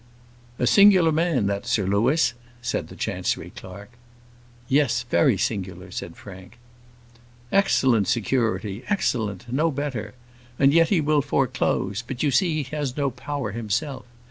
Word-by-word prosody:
"A - - 0
singular 190 -1 +6
man 155 - +1
that 100 +4 -2
Sir 115 -5 +1
Louis," 115 - +2 0.3
said 120 - -3
the - - -12
Chancery - - -3
clerk. 100 +4 -11 0.8
"Yes; 130 -4 +2
very 130 -10 +3
singular," 95 -3 -3
said 85 -1 -6
Frank. 95 +3 -12 0.9
"Excellent 130 - +3
security, 110 -1 -1
excellent; 115 - -1
no 155 +5 +2
better; 140 -6 -4 0.4
and 140 0 +4
yet 165 0 +4
he 185 -6 +3
will 150 0 +2
foreclose; 125 -7 0
but 125 +2 -5
you 145 - +2
see 155 +2 +1
he 135 +3 -8
has 145 -3 -3
no 140 -2 0
power 130 -2 -4
himself. 125 +5 -3
125 Hz, 140 wpm, -24 LUFS, 105-150 Hz, 0.9 s, singular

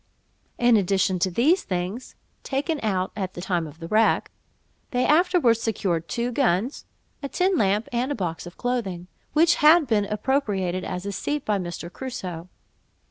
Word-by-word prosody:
In 240 -2 +5
addition 190 -1 +1
to 185 - +2
these 290 - +3
things 185 +7 -4 0.3
(taken 290 +3 -2
out 190 -4 -1
at 190 -3 -4
the - - -6
time 175 -3 -1
of 150 +1 -12
the 165 0 -8
wreck), 220 +4 +2 0.6
they 250 0 +1
afterwards 310 -8 +3
secured 185 -7 -1
two 235 +9 -2
guns, 240 -1 0 0.4
a 280 - -4
tin 370 +5 +1
lamp, 210 - +1
and 245 +3 -1
a - - -1
box 175 -4 -4
of 175 - -12
clothing, 220 -8 -2 0.3
which 330 +3 +4
had 310 +2 +7
been 215 -5 +1
appropriated 205 -5 -1
as 180 +1 -5
a 200 - -2
seat 290 +9 -3
by 210 -2 +1
Mr. 175 -1 -6
Crusoe. 185 -10 -6
210 Hz, 165 wpm, -24 LUFS, 185-265 Hz, 0.6 s, had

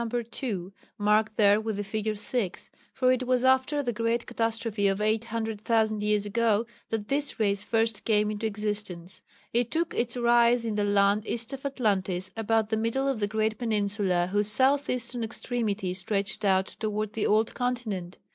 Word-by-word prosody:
2 195 -7 -3 0.2
(marked 210 +1 +2
there 205 0 +4
with 220 -2 -3
the 205 - -2
figure 215 +1 -2
6), 205 -2 -2 0.2
for 255 -1 +2
it 255 0 0
was 255 0 +2
after 260 +3 +3
the 240 -2 -1
great 230 +2 0
catastrophe 225 -2 -1
of 195 0 0
800,000 220 0 0
years 210 -1 +1
ago 225 +1 +1 0.2
that 215 -2 -3
this 280 0 -1
race 200 -2 +1
first 225 -1 0
came 210 -1 +2
into 215 +1 -2
existence. 205 -4 -4 0.3
It 240 0 +1
took 330 +4 -1
its 240 +1 -1
rise 240 0 +4
in 225 - -1
the 210 0 0
land 205 +1 +2
east 235 +3 -3
of 275 +1 -4
Atlantis, 195 -8 -1
about 225 -1 +1
the 220 - 0
middle 230 +5 0
of 270 -5 0
the 205 - +1
great 220 +1 -1
peninsula 200 -5 0
whose 205 0 +1
south 270 +6 +3
eastern 240 -1 -2
extremity 220 -4 -2
stretched 195 +2 -1
out 190 -1 +3
towards 215 0 -3
the 220 -1 -1
old 215 +1 +2
continent. 220 -8 -3
220 Hz, 170 wpm, -27 LUFS, 205-235 Hz, 0.3 s, there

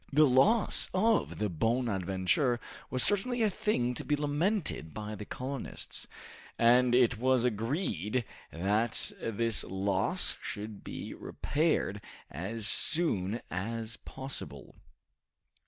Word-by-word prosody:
The 150 +2 +6
loss 150 - +4
of 220 +3 +2
the 105 - 0
"Bonadventure" 105 - +1 0.3
was 130 - +2
certainly 230 +4 +2
a 215 - +3
thing 125 - 0
to - - -4
be 150 - +1
lamented 150 - -1
by 105 0 -5
the 105 0 -7
colonists, 130 +4 -5 0.5
and 120 +1 +5
it 125 -2 +4
was 130 -1 +3
agreed 115 - -1 0.3
that 105 +6 0
this 115 0 +1
loss 100 - 0
should 105 -1 -6
be - - -6
repaired 145 -9 -1 0.3
as 100 +9 -4
soon 115 - +3
as 110 +5 -3
possible. 135 +1 -7
120 Hz, 110 wpm, -31 LUFS, 105-145 Hz, 0.5 s, The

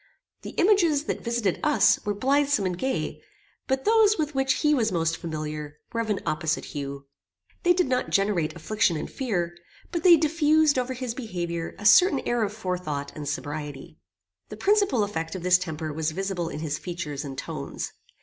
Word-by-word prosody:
The - - -8
images 345 -7 +4
that - - -3
visited 235 -6 0
us 300 -1 +3
were 205 -1 -1
blithsome 275 -1 +2
and 180 -1 -1
gay, 260 +8 -2 0.5
but 265 0 -1
those 435 -1 +5
with 305 -2 -1
which 270 -1 +1
he 300 0 +4
was 225 -6 +1
most 165 -2 +1
familiar 155 -3 -5 0.2
were 230 - 0
of 225 - -4
an 205 - 0
opposite 155 +1 -1
hue. 140 -1 -6 0.6
They 355 - +4
did 360 0 +2
not 255 -1 0
generate 195 -6 +1
affliction 175 0 +1
and - - -4
fear, 175 -10 -2 0.4
but 340 -1 -2
they 345 -1 +8
diffused 310 -2 +3
over 255 +1 -2
his 250 -2 -4
behaviour 175 -9 -4
a 205 - -9
certain 310 - +6
air 240 -1 0
of 205 -2 0
forethought 180 -9 -4
and 145 -2 -4
sobriety. 145 -1 -6 0.5
The - - -8
principal 400 - +3
effect 165 -4 -3
of 180 - -6
this 180 0 +5
temper 160 -3 -4
was 160 +1 -1
visible 190 -2 -2
in 150 - -6
his 155 -2 -2
features 160 -5 -5
and 135 -2 -7
tones. - - -5
200 Hz, 180 wpm, -26 LUFS, 160-270 Hz, 0.6 s, they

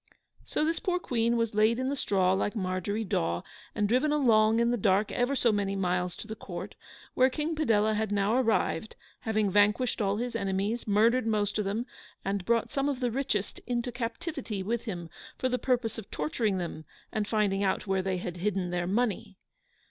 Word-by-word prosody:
So 305 - 0
this 330 +1 0
poor 365 -5 0
Queen 235 -7 0
was 230 -1 0
laid 215 +2 +3
in 260 +1 -1
the 280 - -1
straw 190 -7 +2
like 200 +3 0
Margery 190 +2 -1
Daw, 85 - -1 0.3
and 210 -2 +1
driven 255 +7 +2
along 225 -6 +4
in 235 0 +3
the - - +2
dark 200 -1 +2
ever 245 +3 +1
so 240 -3 +3
many 200 -1 0
miles 180 -2 0
to - - -9
the 220 - -5
Court, - - -7 0.4
where 255 +1 +4
King 305 +4 -2
Padella 220 -8 +2
had 215 0 -1
now 205 +2 +2
arrived, 225 -3 +1 0.2
having 215 -3 0
vanquished 210 +5 +3
all 200 0 +1
his 245 +2 -3
enemies, 200 +4 -1
murdered 225 +4 +3
most 210 -1 0
of 210 - 0
them, 210 +5 -1 0.4
and 195 -1 -1
brought 235 +1 +1
some 275 +1 0
of 275 -3 -2
the 245 -2 0
richest 230 -6 -2
into 245 0 -1
captivity 240 - -4
with 230 +4 -2
him 175 -7 -4 0.3
for 255 - 0
the 250 0 0
purpose 245 -3 0
of 215 - -10
torturing 190 +7 -1
them 170 -3 -4 0.3
and 210 -1 -1
finding 205 -3 +1
out 190 +1 0
where 195 -1 +1
they 185 0 -1
had 180 0 -5
hidden 185 -1 -1
their 175 0 -1
money. 210 -1 -1
215 Hz, 195 wpm, -29 LUFS, 195-245 Hz, 0.4 s, along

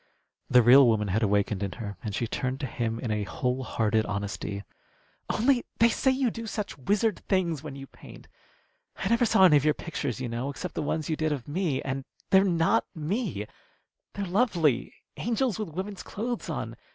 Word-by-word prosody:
The 125 -1 +6
real 130 +3 +8
woman 105 -3 +2
had 105 +5 +1
awakened 100 -1 +1
in 100 -2 -2
her, 105 -4 -6
and 105 -3 -3
she 120 - 0
turned 130 +3 -2
to - - -1
him 115 -2 -2
in 120 -3 -3
a 105 0 0
whole 125 +5 -2
hearted 110 -3 +1
honesty. 100 0 -4 0.7
"Only, 245 +2 +2
they 230 - +5
say 265 - +1
you 260 -2 +2
do 230 +1 -6
such 210 -1 -4
wizard 205 - +1
things 170 -7 +1
when 150 -3 -7
you 135 0 -8
paint. - - -14 0.7
I - - -3
never 235 +1 +3
saw 195 -3 +5
any 155 -5 +7
of 140 - +1
your 150 0 +3
pictures, 145 -7 -4
you 130 - -3
know, 120 +4 -3
except 170 +5 -5
the - - -2
ones 155 0 -2
you 160 - 0
did 155 0 0
of 140 -5 -3
me. 155 -3 -1
And 135 0 -3 0.3
they're 190 0 +7
not 175 +3 +2
me. 165 - -2 0.7
They're 200 - -3
lovely 175 - +1 0.3
angels 235 -1 0
with 215 - -3
women's 190 +4 -5
clothes 235 +3 -4
on. - - -4
150 Hz, 195 wpm, -27 LUFS, -, 0.7 s, real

